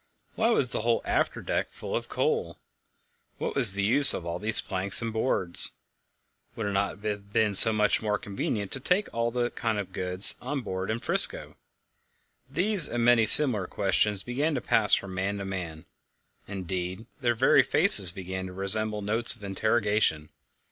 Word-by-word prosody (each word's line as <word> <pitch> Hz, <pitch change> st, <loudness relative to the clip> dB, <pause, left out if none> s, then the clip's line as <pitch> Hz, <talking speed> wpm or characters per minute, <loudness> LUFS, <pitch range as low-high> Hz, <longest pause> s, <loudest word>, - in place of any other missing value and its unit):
Why 225 Hz, +1 st, -2 dB
was 135 Hz, -, 0 dB
the -, -, -4 dB
whole 115 Hz, +1 st, -2 dB
after -, -, -3 dB
deck -, -, -4 dB
full -, -, -9 dB
of -, -, -6 dB
coal? -, -, -4 dB, 0.8 s
What -, -, -6 dB
was 115 Hz, -8 st, +4 dB
the 100 Hz, -, -3 dB
use 135 Hz, +8 st, +3 dB
of 85 Hz, -, -9 dB
all 85 Hz, -, -6 dB
these 105 Hz, +1 st, +1 dB
planks 95 Hz, 0 st, +1 dB
and 115 Hz, -1 st, -6 dB
boards? 105 Hz, -6 st, 0 dB, 0.8 s
Would 110 Hz, -, -6 dB
it 100 Hz, -, -4 dB
not 100 Hz, +1 st, -4 dB
have 100 Hz, -1 st, -7 dB
been 105 Hz, 0 st, -1 dB, 0.2 s
much 105 Hz, 0 st, -1 dB
more 105 Hz, -2 st, -3 dB
convenient 100 Hz, 0 st, -6 dB
to 135 Hz, -, -2 dB
take 180 Hz, +9 st, -3 dB
all 115 Hz, 0 st, -3 dB
that 120 Hz, 0 st, -5 dB
kind 115 Hz, -2 st, -4 dB
of 95 Hz, -2 st, -8 dB
goods 90 Hz, +2 st, +7 dB
on 135 Hz, +2 st, -6 dB
board 95 Hz, -3 st, -7 dB
in 115 Hz, +1 st, -5 dB
'Frisco? -, -, -1 dB, 0.9 s
These 180 Hz, +4 st, +1 dB
and 120 Hz, -1 st, -3 dB
many 120 Hz, -2 st, +2 dB
similar 110 Hz, -6 st, +5 dB
questions 100 Hz, 0 st, -2 dB
began 140 Hz, +6 st, -4 dB
to -, -, -3 dB
pass 105 Hz, -2 st, +2 dB
from 100 Hz, -1 st, -8 dB
man 95 Hz, +2 st, -5 dB
to 100 Hz, -, -8 dB
man; 85 Hz, -5 st, -8 dB, 0.6 s
indeed, 95 Hz, +1 st, -7 dB
their 120 Hz, -3 st, -2 dB
very -, -, +2 dB
faces 90 Hz, -3 st, +4 dB
began 95 Hz, 0 st, -8 dB
to 90 Hz, -, -12 dB
resemble 105 Hz, +2 st, -3 dB
notes 115 Hz, +3 st, -1 dB
of -, -, -20 dB
interrogation. 105 Hz, -5 st, -2 dB
105 Hz, 175 wpm, -25 LUFS, 95-120 Hz, 0.9 s, goods